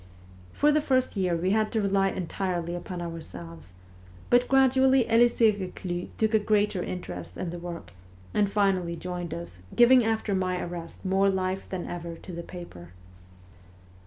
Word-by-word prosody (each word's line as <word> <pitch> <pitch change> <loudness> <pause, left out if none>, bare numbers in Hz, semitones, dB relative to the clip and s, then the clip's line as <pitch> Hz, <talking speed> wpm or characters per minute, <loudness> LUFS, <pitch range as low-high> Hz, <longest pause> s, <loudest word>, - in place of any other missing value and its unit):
For 295 - +3
the 305 +1 +3
first 260 -4 +1
year 185 -3 +1
we 180 +3 0
had 215 0 +1
to 225 - +2
rely 195 0 +2
entirely 175 -1 -3
upon 175 0 -5
ourselves; 90 - -8 0.6
but 245 +1 +5
gradually 265 -1 +4
Elisee 230 -1 +5
Reclus 180 -3 -5
took 220 0 +1
a 220 - +5
greater 210 -2 +1
interest 90 - -6
in 175 - -3
the 175 - -6
work, 170 - -7 0.4
and 205 -1 +2
finally 190 -4 +1
joined 175 -1 -5
us, 85 +1 -7 0.2
giving 245 +1 +7
after 220 -2 0
my 185 -1 0
arrest 175 +1 -7
more 195 +1 +3
life 190 0 -2
than 185 -2 -4
ever 170 -1 -6
to 180 - -11
the 170 0 -5
paper. 170 - -10
185 Hz, 160 wpm, -27 LUFS, 170-215 Hz, 0.6 s, giving